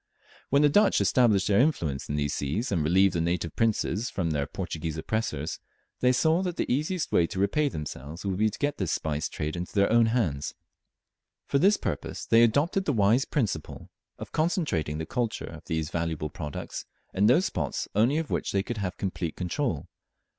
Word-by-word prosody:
When 140 +2 +4
the - - +7
Dutch 205 +9 +4
established 110 -7 +3
their 100 -1 +4
influence 85 - 0
in 75 - -1
these 75 -1 -1
seas, 90 - -2
and 85 -6 +1
relieved 95 +5 +4
the 85 - 0
native 85 -1 -1
princes 110 -1 0
from 85 -4 -2
their 70 -1 -1
Portuguese 80 -2 -4
oppressors, 80 -4 -2 0.4
they 125 - +4
saw 160 +7 +3
that 180 -2 -3
the - - 0
easiest 155 +5 -1
way 85 - +3
to 95 - -5
repay 140 +10 +2
themselves 75 - -7
would 95 -2 -1
be 110 +2 +3
to 105 - -8
get 145 0 -1
this 95 -5 -1
spice 75 -1 -1
trade 75 +2 -4
into 90 0 -5
their 100 0 +3
own 115 0 +5
hands. 95 - -1 0.9
For 140 - +1
this 200 +6 +5
purpose - - -4
they 115 - +5
adopted 145 - +2
the 145 - +1
wise 110 +4 +3
principle 105 - -3 0.3
of - - -8
concentrating 155 - 0
the 80 - -3
culture 120 +3 -2
of - - -10
these 80 0 -2
valuable 80 -3 -2
products 75 -2 -6 0.3
in 100 +2 +3
those 165 - +5
spots 75 -7 -2
only 115 +8 +3
of 160 -2 -3
which - - -1
they 100 -1 +2
could 120 +2 -5
have 95 -2 -3
complete 90 -4 -3
control. 90 - -2
100 Hz, 190 wpm, -27 LUFS, 80-125 Hz, 0.9 s, the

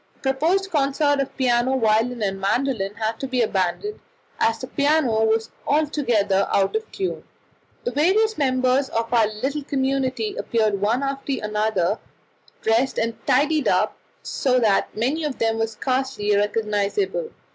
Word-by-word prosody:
A - - -32
proposed 325 +9 +1
concert 285 -1 +2
of 275 - -3
piano, 255 0 +2
violin, 225 +1 +1
and 195 -1 -2
mandolin 210 -1 0
had 225 0 -2
to 270 - -3
be 255 -2 +1
abandoned, 210 - -1 0.4
as 225 0 +2
the 240 - -6
piano 280 -5 +2
was 220 0 0 0.2
altogether 240 -10 +1
out 195 - +2
of 440 0 -3
tune. 380 -1 -3 0.6
The 485 - -2
various 425 +8 +2
members 260 -1 +1
of 230 +1 -2
our 225 -3 +4
little 265 +8 -3
community 265 -5 -1
appeared 215 -4 0
one 230 +6 +1
after 275 0 -2
another, 210 -2 0 0.6
dressed 230 +4 +1
and 230 0 0
tidied 290 +3 +2
up - - +2 0.3
so 255 -2 0
that 215 -4 +2
many 270 +8 0
of 295 -3 -3
them 225 0 0
were 225 - +1
scarcely 255 -2 -1
recognizable. 210 - 0
255 Hz, 145 wpm, -23 LUFS, 220-280 Hz, 0.6 s, our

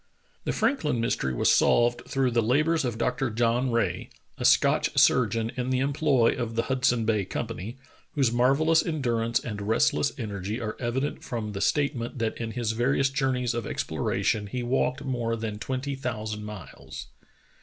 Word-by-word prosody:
The - - 0
Franklin 215 - 0
mystery 115 - 0
was - - +3
solved 120 0 +3
through 135 -2 +1
the 115 0 +2
labors 155 +8 +2
of 120 -4 -2
Dr. 125 +3 0
John 120 +3 +1
Rae, 100 -7 -1 0.3
a - - -3
Scotch - - +4
surgeon 115 -1 +3
in 125 0 -2
the 130 - +1
employ 135 -2 +2
of 115 -2 -4
the 115 - +1
Hudson 125 -2 +1
Bay 110 -2 +1
Company, 105 +5 -5 0.4
whose 135 -5 +2
marvellous 140 +7 +3
en 155 -4 -3
durance 115 -1 +1
and 105 -4 -6
restless 115 +7 +2
energy 105 -2 -4
are 110 -3 -4
evident 130 +4 -2
from 115 -4 -4
the 100 -1 -5
state 145 +6 +1
ment 120 +2 -5
that 115 -2 -1
in 115 -1 -4
his 120 -3 -1
various 135 +4 +1
journeys 130 -3 0
of 120 0 -3
exploration 105 -1 -1
he 125 +4 -4
walked 130 +2 0
more 120 -3 -1
than 110 -2 -5
twenty 130 +4 -3
thousand 110 -5 -4
miles. 105 -2 -9
120 Hz, 170 wpm, -27 LUFS, 115-135 Hz, 0.4 s, Scotch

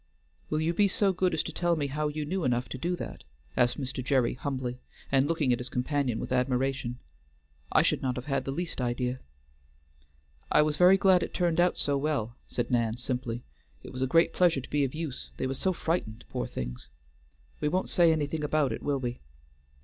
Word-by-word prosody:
"Will 155 - 0
you 160 +2 +1
be 205 +3 +4
so 195 0 +2
good 185 0 +1
as 155 - +1
to - - -5
tell 175 -1 +1
me 150 -3 -1
how 150 +2 -1
you 150 0 -3
knew 185 +4 -2
enough 125 -1 +1
to 130 - -5
do 175 +5 0
that?" - - -7 0.3
asked 125 +1 +2
Mr. 130 -1 -3
Gerry 130 -3 +2
humbly, 130 -2 -4 0.3
and 135 0 +4
looking 150 -6 +2
at 120 - -1
his 125 +1 -3
companion 125 -2 0
with - - -5
admiration. 130 0 0 0.7
"I - - +5
should - - +1
not 130 -1 -1
have 125 - -5
had 135 -2 -1
the 135 - -2
least 165 -1 -3
idea." 125 +1 -1 1.3
"I 150 - +6
was 150 0 0
very 180 +4 +7
glad 190 -2 +5
it - - -4
turned 175 -2 +1
out 175 0 +3
so 140 -1 +2
well," 135 -6 -1
said 120 0 -2
Nan 115 -2 +1
simply. 125 -1 -3 0.4
"It - - -9
was 130 - -5
a 130 - +2
great 165 +6 +4
pleasure 170 -6 +3
to - - -11
be 145 -1 +2
of 135 +1 -2
use, 155 -5 -5
they - - -1
were 130 - -1
so 185 +8 0
frightened, 160 -10 -2
poor 125 -1 -3
things. - - -6 0.7
We - - 0
won't 185 +5 0
say 170 -2 +5
anything 150 0 -1
about 150 -2 +1
it, - - -4
will 145 -1 0
we?" 125 -1 -4
140 Hz, 210 wpm, -29 LUFS, 125-160 Hz, 1.3 s, very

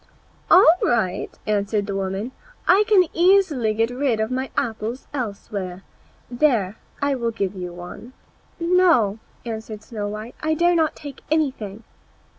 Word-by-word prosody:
"All 360 -3 +8
right," 220 -7 0 0.2
answered 205 0 0
the 200 -1 -4
woman; 195 +5 -3 0.4
"I 395 +4 +5
can 410 -4 +6
easily 340 - +3
get 225 +2 +1
rid 250 -3 0
of 220 +3 -1
my 260 +1 -2
apples 230 0 -2
elsewhere. 200 -6 -5 0.4
There, 240 -6 +1 0.3
I 285 0 +2
will 235 -3 -1
give 200 -4 -2
you 180 -2 -6
one." 175 +8 -10 0.5
"No," 335 - +3 0.3
answered 220 -2 -6
Snow 215 -2 -5
white, 215 +3 -6
"I 315 0 +1
dare 345 +2 +3
not 320 -2 +2
take 285 -2 -9
anything." 260 -9 -1
230 Hz, 140 wpm, -22 LUFS, 205-295 Hz, 0.5 s, All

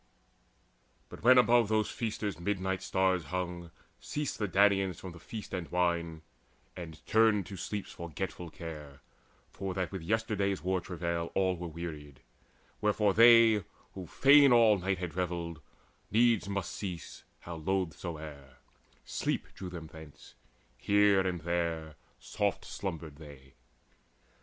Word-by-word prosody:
But - - -11
when 125 +3 +7
above 120 -2 +5
those 110 0 +1
feasters 105 -4 -3
midnight's 95 0 -2
stars 95 -3 +1
Hung, 90 +1 -4 0.3
ceased 150 -1 -4
the 105 - 0
Danaans 95 -2 +3
from 95 - -8
the 85 - -12
feast 105 +5 -8
and 90 -3 -4
wine, 85 -3 -1 0.5
And 80 -3 -9
turned 110 -2 +3
to 95 - -8
sleep's 100 +2 -5
forgetfulness 85 0 -6
of - - -21
care, 75 -4 -8 0.5
For 95 -2 -5
that 95 -2 -2
with 95 -3 -5
yesterday's 100 0 -1
war 95 0 0
travail 85 -1 -3
all 95 -1 +2
Were 85 0 -6
wearied; 75 -4 -8 0.6
wherefore 105 -1 +2
they, 115 -2 +7 0.3
who 95 -3 -8
fain 140 - +6
all 115 -4 +6
night 95 +1 -1
Had 90 -2 -5
revelled, 85 -3 -3 0.5
needs 115 -3 +3
must 100 -1 -3
cease: 90 -5 -6 0.2
how 85 -1 -7
loth 90 -1 -1
soe'er, 75 -6 -8 0.5
Sleep - - -2
drew 95 - -7
them 85 -2 -7
thence; 80 -2 -13 0.4
here, 100 +6 +4
there, 85 -2 -2 0.2
soft - - -2
slumbered 80 -6 -6
they. 70 -4 -13
90 Hz, 135 wpm, -31 LUFS, 85-100 Hz, 0.6 s, when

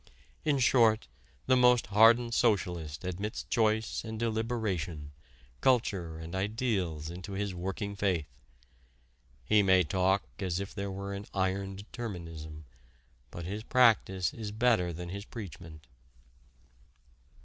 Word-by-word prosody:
In 150 -3 +2
short, 115 - +4 0.4
the 130 - +4
most 125 -1 +5
hardened 115 +2 +6
socialist 90 -11 0
admits 100 +4 -4
choice 110 -1 0
and 110 -1 -6
deliberation, 110 -9 -2 0.5
culture 100 -10 +1
and 80 +1 -8
ideals 95 -6 -1
into 90 +3 -7
his 100 0 -2
working 95 +3 -4
faith. 95 -6 0 1.2
He 105 +10 +5
may 95 -2 +5
talk 95 +4 +1 0.2
as 95 -3 -1
if 100 0 -5
there 100 -1 -4
were 100 +1 -5
an 100 +1 -6
iron 95 0 -1
determinism, 85 -8 -7 0.6
but 85 +5 -7
his 100 +4 -4
practice 110 -8 +3
is 110 -2 -5
better 110 -5 +2
than 85 +1 -6
his 100 +2 -5
preachment. 85 - -9
100 Hz, 120 wpm, -30 LUFS, 90-110 Hz, 1.2 s, hardened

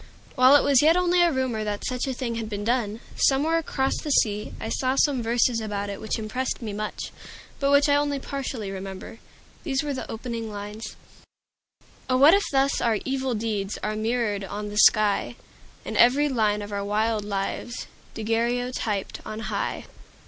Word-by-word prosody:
While 255 +2 +6
it 290 - +5
was 280 -2 +5
yet 320 +3 +5
only 360 0 +3
a 345 -1 +4
rumor 260 -5 -1
that 205 -1 -3
such 255 +1 -2
a 265 - -1
thing 240 -2 -3
had 225 -1 -4
been 205 -1 -4
done, 230 -1 -1
somewhere 305 +5 +3
across 270 -4 -1
the 305 - -5
sea, 210 -6 +1
I - - -5
saw 260 +2 0
some 275 -2 +2
verses 235 +1 +2
about 205 -2 -3
it 200 - -7
which 220 - -2
impressed 230 +4 -3
me 220 -4 -5
much, 215 +1 -5 0.5
but 275 - +1
which 285 +1 +5
I 285 0 +4
only 290 -1 0
partly 265 -7 -5
remember. 195 +3 -7 0.4
These 275 -3 -1
were 290 -1 -2
the 260 - -6
opening 230 -1 -5
lines: 210 +2 -7 1.1
"Oh, 255 - +3
what 285 +5 +7
if 400 +1 +3
thus 275 0 +2
our 230 -2 +2
evil 265 -2 -1
deeds 210 -2 -2
Are 215 0 -1
mirrored 215 -2 -1
on 205 +2 -5
the 205 - -6
sky, 215 -2 +4 0.5
And - - -5
every 270 +5 +5
line 210 -5 +1
of 205 - -8
our 200 0 -2
wild 215 +1 0
lives 205 +4 -4 0.3
Daguerreotyped 230 -1 -1
on 215 0 -6
high!" - - -2
230 Hz, 180 wpm, -25 LUFS, 210-270 Hz, 1.1 s, what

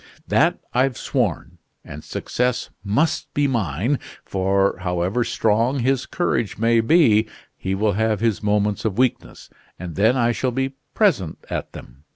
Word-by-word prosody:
That - - +3 0.2
I've 130 0 +1
sworn; 120 - -2 0.3
and 75 +2 -9
success 125 0 -2
must 120 +11 0
be 145 - +2
mine, 115 - 0 0.3
for, 95 +1 +1
however 90 +5 0
strong 115 +5 +1
his 130 +1 0
courage 120 - -1
may 115 +2 +3
be, 115 -5 +4 0.3
he 95 +1 -3
will 105 +1 +1
have 110 0 0
his 115 -2 0
moments 105 -1 0
of 110 -3 -2
weakness, 125 -1 -1 0.3
and 90 -2 -7
then 110 - +3
I 120 -1 +3
shall 125 +3 -1
be 135 +2 -2 0.2
present 135 - +2
at - - -4
them. 65 +5 -13
110 Hz, 150 wpm, -22 LUFS, 95-125 Hz, 0.3 s, be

